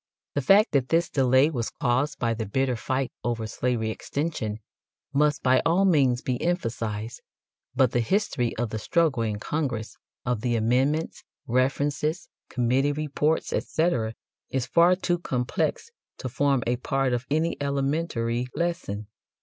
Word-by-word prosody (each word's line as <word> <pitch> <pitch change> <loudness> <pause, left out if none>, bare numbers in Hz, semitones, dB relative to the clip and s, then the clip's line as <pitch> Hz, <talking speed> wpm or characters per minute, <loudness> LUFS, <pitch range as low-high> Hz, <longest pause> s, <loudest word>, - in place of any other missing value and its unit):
The 145 - 0
fact 200 - +5
that 135 -3 +1
this 165 +1 +2
delay 130 +2 +4
was 120 -6 -2
caused 135 +3 +1
by 115 -3 0
the 110 -2 -4
bitter 130 +4 0
fight 130 +4 -2
over 115 -2 -1
slavery 110 0 -1
extension 125 -5 -3 0.6
must 150 +1 +2
by 130 0 +4
all 175 +4 +3
means 135 -9 +3
be 125 -2 -2
emphasized, 115 - -2 0.5
but 130 -2 +4
the 120 - +1
history 125 - 0
of 120 -1 -2
the 110 - -3
struggle 155 -3 +1
in 110 -2 -1
Congress, 120 -2 -3 0.3
of 120 -3 -1
the 120 -1 0
amendments, 130 +8 +1 0.2
references, 145 +6 0 0.2
committee 130 +4 +1
reports, 150 +1 0
etc., 120 -10 0 0.3
is 130 -2 -1
far 170 +2 +5
too 175 -1 -1
complex 125 - -2 0.3
to - - -5
form 135 0 +1
a 120 +1 +1
part 135 0 0
of 120 +2 -2
any 160 +3 +1
elementary 135 -4 -1
lesson. 170 - -2
130 Hz, 145 wpm, -26 LUFS, 120-150 Hz, 0.6 s, fact